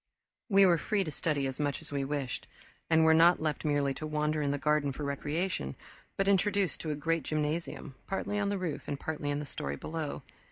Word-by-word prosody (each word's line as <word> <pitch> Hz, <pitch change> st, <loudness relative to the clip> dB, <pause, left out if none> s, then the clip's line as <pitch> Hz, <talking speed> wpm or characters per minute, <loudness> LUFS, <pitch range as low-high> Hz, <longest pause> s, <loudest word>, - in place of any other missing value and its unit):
We 195 Hz, -1 st, +7 dB
were 175 Hz, -3 st, +5 dB
free 200 Hz, +5 st, +1 dB
to 155 Hz, -, -4 dB
study 150 Hz, -2 st, 0 dB
as 135 Hz, +1 st, -3 dB
much 145 Hz, -1 st, 0 dB
as -, -, -11 dB
we 140 Hz, -1 st, -1 dB
wished, 135 Hz, -2 st, -3 dB, 0.4 s
and 160 Hz, 0 st, +5 dB
were 160 Hz, -, +7 dB
not 170 Hz, +2 st, +6 dB
left 155 Hz, -2 st, -1 dB
merely 145 Hz, -2 st, +1 dB
to 155 Hz, -, -5 dB
wander 150 Hz, 0 st, 0 dB
in 145 Hz, -, +1 dB
the 145 Hz, -, 0 dB
garden 150 Hz, 0 st, +2 dB
for 140 Hz, +3 st, -6 dB
recreation 145 Hz, -, -2 dB, 0.4 s
but 195 Hz, -, +1 dB
introduced 200 Hz, -1 st, +2 dB
to 160 Hz, -, -4 dB
a 150 Hz, -, 0 dB
great 165 Hz, +2 st, 0 dB
gymnasium, 155 Hz, 0 st, -2 dB
partly 205 Hz, +1 st, -1 dB
on 200 Hz, -1 st, +1 dB
the 200 Hz, -, 0 dB
roof 180 Hz, -5 st, -4 dB
and 140 Hz, -, -3 dB
partly 150 Hz, -2 st, -3 dB
in 145 Hz, -, 0 dB
the 150 Hz, -, -3 dB
story 70 Hz, -, -4 dB
below. 155 Hz, -, -4 dB
150 Hz, 215 wpm, -31 LUFS, 145-170 Hz, 0.4 s, We